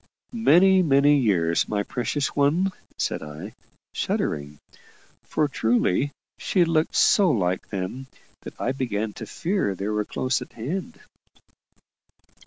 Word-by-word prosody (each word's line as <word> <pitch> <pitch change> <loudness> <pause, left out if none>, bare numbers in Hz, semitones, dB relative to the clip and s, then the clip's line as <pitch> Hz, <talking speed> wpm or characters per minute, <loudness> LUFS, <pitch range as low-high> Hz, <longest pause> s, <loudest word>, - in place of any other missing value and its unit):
"Many, 190 -4 +5
many 145 -2 +4
years, 85 -9 +1
my 105 -1 0
precious 135 +5 -2
one," 160 +7 +2 0.3
said - - -2
I, 80 +7 -8 0.4
shuddering; 75 0 -2 0.6
for 150 - 0
truly 120 -1 +1 0.3
she 180 -3 +2
looked 165 0 0
so 200 -4 +5
like 95 - 0
them, 100 +7 -5 0.3
that - - -11
I 125 - 0
began 110 -5 -2
to - - -8
fear 175 - -1
they 100 +3 -4
were 105 0 0
close 130 +4 -1
at 125 - -10
hand. 180 - -5
130 Hz, 125 wpm, -24 LUFS, 100-160 Hz, 0.6 s, Many